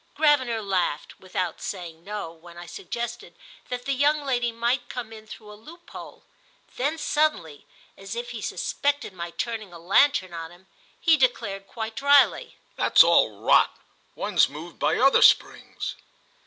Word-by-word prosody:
Gravener 260 -8 +2
laughed, 185 -6 -2
without 185 -2 -4
saying 170 -4 -7
no, 205 -4 -6
when 170 +1 -15
I 175 - -9
suggested 235 +7 -6 0.3
that 245 0 -5
the 275 - 0
young 290 +2 +1
lady 245 -3 0
might 240 +2 -1
come 235 -3 -6
in 220 0 -13
through 215 -1 -11
a - - -10
loophole; 320 +12 -13 0.5
then 290 +6 -1
suddenly, 295 - -1 0.3
as - - -8
if 485 +1 -5
he - - -7
suspected 285 -7 -2
my 170 -1 -6
turning 220 +1 -5
a 170 - -11
lantern 185 +2 +2
on 165 -1 -6
him, 175 +2 -18 0.3
he 325 -2 +4
declared 200 -7 0
quite 220 0 -6
dryly: 280 -7 +3 0.2
"That's - - +6
all - - +3
rot—one's - - +1
moved 155 +5 -10
by - - +1
other 270 +2 +4
springs!" - - +2
225 Hz, 150 wpm, -25 LUFS, 180-275 Hz, 0.5 s, That's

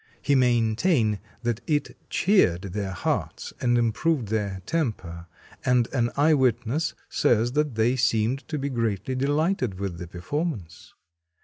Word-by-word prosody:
He 145 - +1
maintained 120 - +2 0.2
that 120 -1 -1
it 145 -2 0
cheered 175 - +3
their 100 -2 -2
hearts 95 - -3
and 120 -1 +3
improved 120 +2 +1
their 100 -4 -2
temper, 95 - -3 0.4
and 125 -2 +3
an 120 -3 +1
eye 155 +3 +5
witness 130 +3 +1
says 120 +1 +2
that 150 -2 0
they 115 +3 +2
seemed 120 0 +1
to 155 - -3
be 140 0 -2
greatly 115 -1 -1
delighted 140 - 0
with 95 -4 -4
the 90 - -6
performance. 95 - -5
120 Hz, 135 wpm, -25 LUFS, 105-145 Hz, 0.4 s, eye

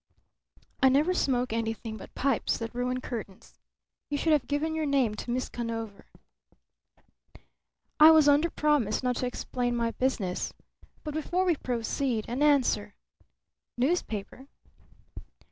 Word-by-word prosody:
"I 265 - +6
never 295 +7 +3
smoke 250 -8 0
anything 225 -1 -3
but 210 - -12
pipes 270 -4 0
that 230 -1 -6
ruin 250 +1 -2
curtains. 210 -7 -7 0.6
You 290 - -1
should 315 +2 +2
have 295 -3 +1
given 300 +2 -1
your 315 -1 -1
name 270 -6 +2
to 215 - -7
Miss 250 +1 -1
Conover." 225 -3 -6 1.9
"I 310 +1 +10
was 315 -2 +6
under 290 +4 +4
promise 290 -9 +1
not 250 -1 0
to 250 - -1
explain 245 0 -2
my 230 -1 0
business. 225 -8 -2 0.5
But 300 - -5
before 350 +4 -1
we 350 -3 +3
proceed, 245 -2 -2
an 245 +4 -3
answer. 260 -8 +2 0.8
Newspaper?" 255 - -2
255 Hz, 130 wpm, -28 LUFS, 230-290 Hz, 1.9 s, I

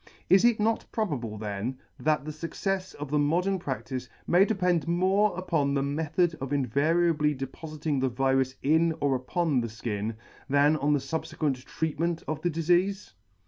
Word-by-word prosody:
Is 190 0 +7
it 240 -2 +4
not 220 +1 +1
probable 135 - -2
then, 105 +4 -4 0.2
that 150 -2 +1
the 155 - -4
fuccefs 185 +4 -3
of 145 -1 -7
the 150 - +2
modern 180 +6 +1
praCtice 130 -3 -4 0.2
may 180 +3 +5
depend 180 -7 +1
more 185 +3 +2
upon 155 -6 0
the 135 - +1
method 160 +4 0
of 135 0 -4
invariably 150 +3 +2
depofiting 150 +2 -4
the 130 - +2
virus 130 +1 +1
in 160 +3 +3
or 140 -1 +2
upon 135 +2 0
the 115 - -2
fkin, 110 -1 -4 0.3
than 145 +2 +4
on 150 0 +2
the 145 - +2
fubfequent 145 -3 -2
treatment 160 +1 -2
of 155 0 -3
the 175 - +1
difeafe 175 - +1
150 Hz, 160 wpm, -28 LUFS, 135-175 Hz, 0.3 s, Is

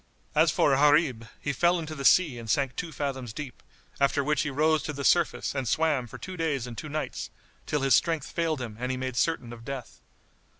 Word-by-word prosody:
As 160 +2 +4
for 150 - +3
Gharib, 145 -5 +3
he 145 - -2
fell 175 +6 +3
into 160 -2 -5
the 140 -3 -6
sea 145 -4 +4
and 115 -1 -8
sank 135 +3 +1
two 170 -2 -4
fathoms 135 -5 -4
deep, 140 0 -7 0.4
after 140 0 +2
which 150 +3 +1
he 155 - -1
rose 155 +2 +2
to 155 - -4
the 140 0 -5
surface 170 +2 +2
and 135 -3 -2
swam 150 -3 +1
for - - -10
two 185 - -7
days 155 -7 -1
and 120 -1 -7
two 150 - -6
nights, 155 +1 -4 0.4
till 150 - 0
his 135 -2 +4
strength 160 +1 +2
failed 160 -4 -1
him 110 -3 -6
and 125 +1 -2
he 130 - -1
made 130 -1 -4
certain 130 -4 0
of 115 -1 -11
death. 130 -1 -7
140 Hz, 220 wpm, -27 LUFS, 130-155 Hz, 0.4 s, As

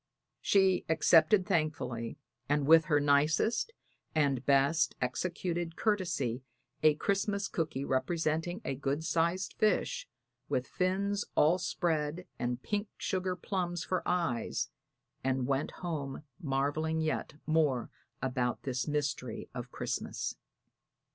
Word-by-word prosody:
She 190 -2 +4
accepted 165 +4 +5
thankfully 155 - -1 0.3
and 145 -1 +2
with 160 +1 +7
her 150 -3 +3
nicest 150 - +2 0.4
and 140 -5 +2
best 140 +3 +3
executed 170 +5 -2
courtesy 170 - 0 0.4
a 155 -1 +5
Christmas 200 +3 0
cooky 155 -4 -2
representing 160 - 0
a - - -1
good 140 +3 -2
sized 170 +3 +1
fish, - - +1 0.4
with 125 - 0
fins 200 +4 0
all 165 +5 +4
spread 170 -2 -1
and 125 +1 -2
pink 210 0 -1
sugar 185 -1 -1
plums 175 -2 -2
for 185 - -1
eyes, 165 -10 0 0.5
and 130 -1 +1
went 135 +2 0
home 150 -6 -5 0.2
marveling 155 +1 0
yet 155 -1 -2
more 150 -6 +1 0.3
about 125 -2 -1
this 130 0 -2
mystery 145 -5 -2
of 125 0 -6
Christmas. - - -3
160 Hz, 115 wpm, -32 LUFS, 140-180 Hz, 0.5 s, with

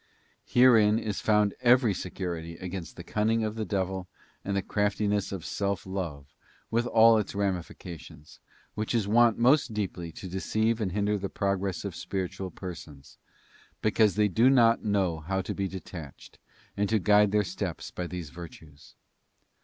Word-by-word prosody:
Herein 115 -4 +5
is 105 -3 -3
found 105 -2 +3
every 120 -3 +4
security 85 -2 -5
against 90 -1 -6
the - - -9
cunning 110 +1 0
of 110 -1 -2
the 110 -1 -3
devil 95 -2 -2 0.4
and 100 0 -2
the 100 - -1
craftiness 105 0 0
of 95 -4 -5
self 100 -2 -2
love 80 -7 -5 0.4
with 120 +1 +1
all 115 -1 +6
its 105 - -4
ramifications, 90 -5 -5 0.3
which 110 +2 -2
is 110 -4 +1
wont 115 +1 +4
most 125 -1 +3
deeply 90 -5 -3
to 95 - -8
deceive 110 +5 0
and 95 -4 -1
hinder 105 +2 0
the 100 0 -4
progress 100 -1 -2
of - - -5
spiritual 95 0 -4
persons, 80 -6 -10 0.6
because 110 -1 +3
they 105 0 +3
do 115 +6 +4
not 120 -3 +4
know 95 -6 0
how 95 +5 -2
tw 95 - -4
be 100 -1 -1
detached, 90 -6 -10 0.4
and 100 0 0
to 110 - +3
guide 105 +1 +4
their 105 0 +3
steps 90 -2 -5
by 90 - -4
these 85 -3 -6
virtues. 80 -4 -12
100 Hz, 160 wpm, -28 LUFS, 90-110 Hz, 0.6 s, all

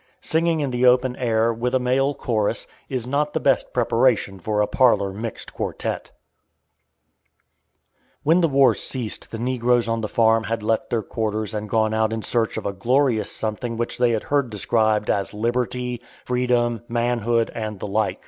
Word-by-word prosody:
Singing 165 0 +1
in 140 -3 -1
the 125 0 -1
open 125 0 +3
air, 115 -2 +1
with 120 +3 -1
a - - +3
male 135 +3 +1
chorus, 110 -4 -1 0.2
is 125 -3 -2
not 145 +3 -1
the - - 0
best - - +1
preparation 115 -5 +1
for 105 +4 -1
a 105 - +4
parlor 105 -6 +2
mixed 110 +3 -6
quartette. - - -4 2.1
When 165 +4 +4
the 165 - +4
war 135 -2 +4
ceased 125 -5 -4
the 115 - -6
negroes 120 0 +1
on 115 0 -1
the 110 - -2
farm 115 0 +3
had 115 0 -3
left 110 +1 0
their 115 -2 0
quarters 110 0 -3
and 105 0 -4
gone 110 0 +1
out 110 0 +1
in 110 -1 -3
search 115 +2 0
of - - -5
a 100 - -1
glorious 115 +1 +1
something 115 +2 -3
which 120 +1 -3
they 125 -1 +4
had 115 -2 0
heard 140 -4 0
described 110 0 +1
as 100 +1 -2
"liberty," 120 +2 -2 0.2
freedom, 125 -2 +1
"manhood," 120 -1 0
and 110 -3 -5
the - - -5
like. 105 +1 -1
115 Hz, 175 wpm, -22 LUFS, 110-125 Hz, 2.1 s, a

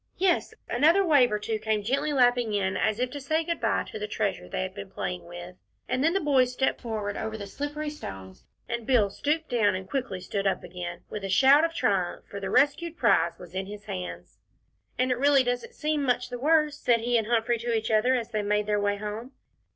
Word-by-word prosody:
Yes 365 -2 +1
another 325 +10 +4
wave 280 -8 +5
or 210 - +1
two 215 +1 -3
came 215 -1 -1
gently 280 +7 0
lapping 245 -5 +3
in, 190 -1 0
as 215 -1 +1
if 250 0 -1
to 285 - -6
say 315 +4 0
good 335 +1 -3
bye - - +1
to - - -8
the 210 - -3
treasure 210 -2 -2
they - - -2
had 185 0 -5
been 200 -1 -8
playing 180 -1 -4
with, 175 +1 -9 0.3
and 255 - 0
then 325 +2 +3
the 390 - +2
boys 265 -6 +3
stepped 265 +1 0
forward 215 -4 -3
over 220 0 -4
the 200 - -6
slippery 295 +7 -4
stones, 95 - -9 0.2
and 235 -1 -4
Bill 220 -7 +3
stooped 305 +7 -1
down 215 -5 +2
and 185 0 -6
quickly 255 -6 -3
stood 195 +2 -2
up 195 - 0
again, 175 0 -7
with 210 - -5
a 195 - -3
shout 270 +9 +6
of 330 0 0
triumph, 190 - 0
for 200 - -7
the 195 -1 -4
rescued 305 - +2
prize 170 - +3
was 175 -1 -12
in 190 +1 -3
his 205 0 -9
hands. 185 -4 -7 0.6
"And 255 +1 +1
it 250 - 0
really 280 -1 +5
doesn't 245 -1 -3
seem 305 -1 -1
much 250 -2 0
the 245 -1 -5
worse," 300 +1 +2
said 235 -2 +2
he 240 +1 0
and 225 -2 +2
Humphrey 235 0 +1
to 235 +1 -2
each 225 -1 0
other, 220 +4 +3
as 235 -2 -3
they 215 -2 0
made 210 0 0
their 210 0 0
way 205 0 +1
home. 215 +5 -6
230 Hz, 230 wpm, -27 LUFS, 200-275 Hz, 0.6 s, shout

